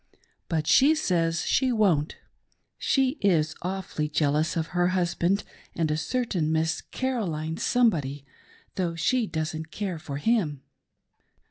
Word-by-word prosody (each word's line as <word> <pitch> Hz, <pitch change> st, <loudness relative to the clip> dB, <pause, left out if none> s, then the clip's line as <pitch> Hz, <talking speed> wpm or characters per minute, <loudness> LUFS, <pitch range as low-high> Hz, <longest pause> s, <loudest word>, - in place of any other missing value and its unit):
But 160 Hz, -3 st, 0 dB
she 285 Hz, -, +5 dB
says 170 Hz, -, 0 dB
she 260 Hz, -1 st, +2 dB
won't. 185 Hz, -10 st, +2 dB, 0.6 s
She 270 Hz, +1 st, +1 dB
is 160 Hz, -6 st, +2 dB
awfully 180 Hz, -5 st, -3 dB
jealous 150 Hz, +2 st, +1 dB
of 160 Hz, -1 st, -2 dB
her 175 Hz, 0 st, +3 dB
husband 180 Hz, +1 st, +1 dB, 0.3 s
and 160 Hz, -2 st, 0 dB
a -, -, +1 dB
certain 180 Hz, -3 st, -1 dB
Miss 160 Hz, 0 st, 0 dB
Caroline 170 Hz, -12 st, -3 dB
somebody, 150 Hz, -, +1 dB, 0.5 s
though 175 Hz, -3 st, -1 dB
she 235 Hz, +7 st, +1 dB
doesn't 160 Hz, -1 st, -4 dB
care 190 Hz, -4 st, -4 dB
for 140 Hz, -2 st, -6 dB
him.'' 150 Hz, -, 0 dB
170 Hz, 125 wpm, -26 LUFS, 155-205 Hz, 0.6 s, she